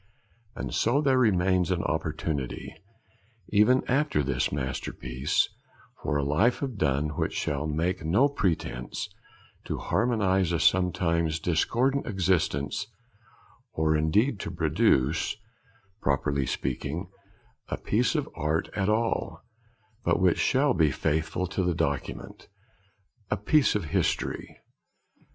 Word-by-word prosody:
And - - -5
so 120 +5 +2
there 135 -3 +3
remains 95 -5 +3
an 90 -2 0
opportunity, 75 -4 -3 0.8
even 110 +5 +4
after 135 - +1
this - - 0
masterpiece, 65 -1 -1 0.5
for 75 - 0
a 70 - 0
life 80 - +2
of 130 -4 -3
Donne 70 -1 +1
which - - -1
shall 75 +1 -2
make 85 +4 -1
no 100 - +4
pretence 85 - -2 0.6
to - - -3
harmonise 100 -6 +1
a 85 - 0
sometimes 85 -3 +2
discordant 120 - +1
existence, 90 - 0 0.9
or 80 -3 +2
indeed 100 - +2
to - - -4
produce, 75 +9 +1 0.6
properly 70 0 0
speaking, 75 +8 -3 0.6
a - - -3
piece 120 +9 +1
of 150 -3 0
art 80 0 -1
at 100 -1 0
all; 115 +1 -1 0.6
but - - +2
which 90 -2 +3
shall 135 +1 +3
be 80 -7 +3
faithful 80 +5 -1
to 95 - -2
the 90 -2 0
document, 70 -4 -3 0.8
a 105 - 0
piece 135 - +3
of 100 -5 -1
history. - - -1
90 Hz, 120 wpm, -27 LUFS, 75-105 Hz, 0.9 s, even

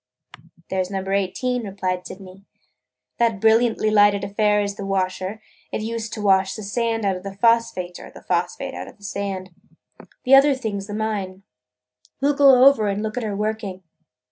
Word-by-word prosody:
"There 190 -1 +1
's 180 - -8
Number 195 0 -3
Eighteen," 235 +6 -1
replied 185 -3 -3
Sydney. 190 0 -12 0.8
"That 230 -3 +2
brilliantly 225 0 +3
lighted 205 -1 +4
affair 210 +1 +1
is 200 -1 -1
the 200 - -8
washer. 190 +2 -2 0.3
It - - -3
's - - -4
used 225 0 -4
to 210 - -5
wash 190 -1 +3
the 215 - -7
sand 225 +1 -1
out 195 -1 +1
of - - -10
the 195 0 -8
phosphate 200 -5 +1
or - - -11
the - - -14
phosphate - - -2
out - - -7
of - - -14
the 205 - -22
sand. 195 -2 -4 0.7
The 260 - +2
other 275 +1 +7
thing 220 -6 -4
's 195 - -10
the 205 - -5
mine. 200 -3 -3 0.8
We 280 +2 +2
'll - - +3
go 270 -3 +6
over 270 -7 +5
and 200 +1 -2
look 215 0 -4
at 250 - -2
her 215 -3 -3
working." 210 -3 -3
205 Hz, 195 wpm, -22 LUFS, 195-225 Hz, 0.8 s, other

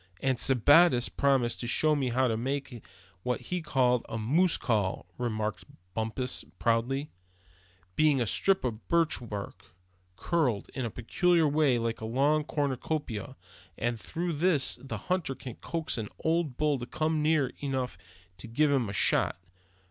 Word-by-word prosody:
"And 130 -2 0
Sebattis 145 +6 +6
has 120 0 0
promised 135 -4 +1
to 120 - -4
show 155 +5 +3
me 135 -3 0
how 130 +2 +2
he 115 - 0
makes 135 +4 -3 0.5
what 125 +5 -1
he 180 -1 -4
calls 125 -5 +2
a 110 - -3
'moose 155 +11 +2
call'," 105 -6 -1
remarked 110 -4 -2 0.3
Bumpus, 115 +4 -2
proudly; 120 +5 0 0.8
"being 150 -3 +3
a 120 - +1
strip 195 - +2
of 115 -3 -4
birch 165 -1 +2
bark, 100 -4 -8 0.4
curled 135 - 0
up - - -19
in 130 - -2
a - - -2
peculiar 165 - +2
way 145 -3 +3
like 115 -1 -2
a - - -4
long 140 +6 +2
cornucopia; 145 -5 -3 0.4
and 120 0 -1
through 170 +8 -3
this 155 -2 +2
the 135 - -5
hunter 180 -7 -2
can 130 -1 -8
coax 165 -7 -3
an 105 -2 -4
old 160 -5 0
bull 150 -3 +1
to 120 - -6
come 155 +2 -1
near 150 -4 +2
enough 130 -3 -2 0.4
to 115 - -7
give 145 +6 +2
him 130 -7 +1
a - - -5
shot. - - +2
135 Hz, 165 wpm, -29 LUFS, 115-155 Hz, 0.8 s, Sebattis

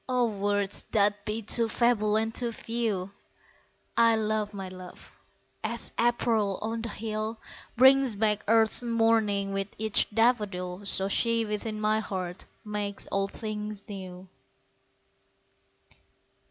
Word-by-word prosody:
O 250 -1 +3
words 205 -1 0
that 205 -1 +2
be 215 +2 -3
too 230 +2 +3
feeble 215 -2 +2
and 225 +1 0
too 240 -1 0
few! 220 -5 -2 0.8
I 230 -1 +5
love 215 -1 -1
my 195 -2 -6
love! 185 -1 -11 0.5
as 235 +1 -2
April 230 -4 +1
on 225 +1 -3
the 230 - -4
hill 215 +1 -4 0.4
Brings 265 -1 +6
back 210 0 +1
earth's 225 +1 +3
morning 225 -4 +1
with 195 0 -1
each 220 -1 +2
daffodil, 205 -5 0
So 195 0 +2
she 230 +2 +1
within 215 +1 -3
my 215 0 +2
heart 185 -4 -5 0.2
makes 205 -1 -3
all 195 0 +1
things 210 -1 -5
new. 185 -2 -8
215 Hz, 125 wpm, -28 LUFS, 200-225 Hz, 0.8 s, Brings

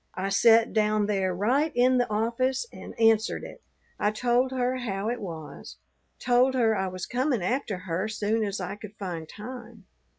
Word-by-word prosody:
I 190 +1 -2
set 225 +3 +5
down 215 -1 +2
there 195 -3 0
right 250 - +1
in 255 +1 +4
the 245 - 0
office 235 - 0
and - - -10
answered 225 0 +3
it. - - -10 0.4
I 210 - +2
told 245 +4 +1
her 255 0 0
how 210 -4 -3
it 245 0 -3
was, 165 -6 -8 0.4
told 250 +2 +3
her 225 -3 +3
I 190 -1 -1
was 185 0 -5
coming 250 -4 0
after 235 -1 -1
her 180 +2 -3
soon 215 +1 -1
as 200 -1 -3
I 185 +2 -5
could 210 0 -11
find 170 -6 -5
time. 235 -2 -10
220 Hz, 175 wpm, -27 LUFS, 195-245 Hz, 0.4 s, set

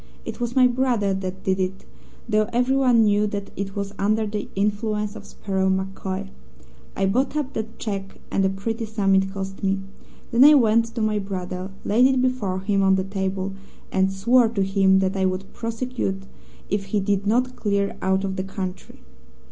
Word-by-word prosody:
It - - -6
was 240 +1 -2
my 260 -1 +6
brother 245 -5 +1
that 190 0 -5
did 190 0 0
it, 190 +1 -3 0.4
though 215 -1 +2
everyone 250 -1 +3
knew 210 0 +3
that 200 -1 -5
it 195 0 -4
was 200 0 -3
under 215 +2 +2
the 210 0 -4
influence 210 +1 -1
of 205 -2 -10
Sparrow 190 -1 -1
MacCoy. 190 - -3 0.7
I 195 - +1
bought 255 +9 +1
up 280 -2 -2
that 220 +1 -5
cheque, 195 -3 -5
and 195 - +2
a 190 - +3
pretty 225 +4 -3
sum 205 -3 +1
it 190 0 +3
cost 195 0 -6
me. 195 0 +1 0.5
Then 235 +3 +6
I 300 +1 +9
went 230 -3 +4
to 230 -1 -4
my 215 -1 +1
brother, 185 -1 -5 0.2
laid 240 +5 +5
it 265 -1 +2
before 240 -8 0
him 195 0 +1
on 190 0 +4
the 190 - 0
table, 190 0 -3 0.4
and 190 0 +2
swore 235 +5 +4
to 210 -4 0
him 195 0 +3
that 190 +1 0
I 190 -1 +1
would 185 +1 -4
prosecute 230 -4 -3 0.4
if 200 0 -1
he 205 +2 0
did 200 0 0
not 250 +4 +1
clear 200 -1 0
out 190 +1 +1
of 190 -1 -3
the 185 - -1
country. 190 -1 -6
200 Hz, 190 wpm, -23 LUFS, 190-225 Hz, 0.7 s, I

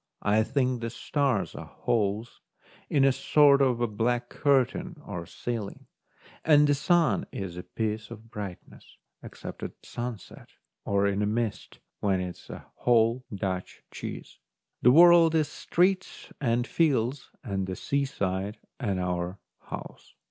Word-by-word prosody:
I 105 +2 +3
think 125 0 0
the 115 - -2
stars 130 -2 -1
are - - -8
holes 110 0 -2 0.5
in 140 -2 +4
a 135 - +6
sort 140 +1 +5
of 120 -5 +1
black 120 +1 0
curtain 150 +5 +1
or 85 -1 -6
ceiling, 115 -5 -5 0.6
and 150 -2 +6
the 145 - +3
sun 150 - +2
is 95 -3 -5
a 90 - -5
piece 105 +4 -3
of 115 0 -11
brightness, 100 -4 -9 0.2
except - - -9
at - - -5
sunset 120 -3 -7 0.4
or 100 0 +2
in 100 0 +1
a 105 - +1
mist, 115 0 -2 0.2
when 95 -2 +1
it 90 -1 -4
is - - -18
a - - -8
whole 120 +1 +3
Dutch 95 -2 -4
cheese. - - -8 0.4
The 125 - +6
world 165 +2 +7
is 155 -2 +2
streets 185 +5 0
and 120 -2 +1
fields 135 -4 +1
and 95 -6 -2
the 95 - -3
seaside 100 -8 -2 0.2
and 100 -8 -1
our 90 +1 -2 0.2
house. - - -9
115 Hz, 140 wpm, -28 LUFS, 100-140 Hz, 0.6 s, world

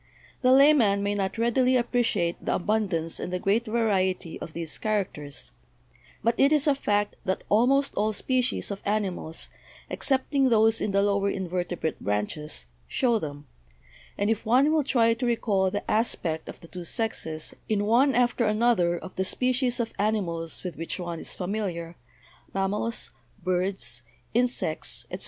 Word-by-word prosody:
The 255 -1 +4
layman 260 -8 +5
may 205 0 0
not 195 +1 -2
readily 250 +3 +3
appreciate 235 -8 0
the - - 0
abundance 175 -5 0
and - - -4
the 180 - 0
great 205 +6 +1
variety 190 -6 0
of 155 - -8
these 165 -2 -3
characters, 185 -9 -3 0.7
but 230 +2 +3
it 275 +2 +5
is 300 -2 +3
a 290 - +5
fact 205 -6 0
that 190 - -1
almost 270 +6 +3
all 215 +1 +1
species 255 +1 -1
of 200 - -5
animals, 195 -6 -2 0.4
excepting 270 0 +2
those 225 -1 +4
in - - 0
the 200 0 +2
lower 200 0 +2
invertebrate 180 -3 -3
branches, 105 - -3 0.2
show 235 -3 +1
them, 145 -3 -7 0.7
and 205 +2 +1
if 225 - -1
one 255 +7 +4
will 315 -2 +3
try 230 -4 +3
to 235 +2 -3
recall 205 -5 +1
the 205 +2 -3
aspect 170 -8 0
of - - -9
the 165 - -12
two 180 +1 -8
sexes 165 -5 -3 0.2
in 205 -2 +1
one 250 +5 +4
after 245 -1 +2
another 210 -6 +2
of 185 - -9
the 190 - +1
species 250 +5 0
of 230 -1 -2
animals 180 -6 -1
with 180 -4 -5
which 165 +3 -4
one 170 -2 -4
is - - -3
familiar, 180 -4 -3 0.6
mam 195 0 +1
mals, 230 +3 -2 0.3
birds, 185 -8 0 0.3
insects, 245 +2 0
etc. - - -4
205 Hz, 160 wpm, -26 LUFS, 180-235 Hz, 0.7 s, layman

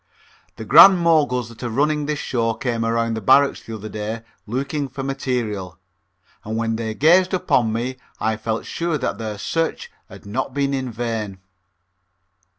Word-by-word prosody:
The - - -8
Grand 195 -1 +9
Moguls 150 -8 +2
that 115 -1 -14
are 120 - -3
running 150 +4 0
this 150 -1 -1
show 115 -4 -1
came 115 -2 -2
around 115 0 0
the 110 - -3
barracks 140 +6 +4
the 115 - -8
other 110 0 -7
day 110 +2 -5 0.2
looking 140 +5 -2
for 135 +1 -7
material, 120 - -3 0.7
and 110 +1 -4
when 115 0 -1
they 110 -1 -4
gazed 180 - +4
upon 120 -10 +1
me 120 +3 -3 0.2
I 110 0 0
felt 110 +1 -3
sure 170 -2 -2
that 135 - -3
their 110 -2 -4
search 165 +10 -2 0.2
had - - -13
not 125 +6 -3
been 140 -1 0
in 130 -2 -2
vain. 110 -4 -4
120 Hz, 165 wpm, -21 LUFS, 110-140 Hz, 0.7 s, Grand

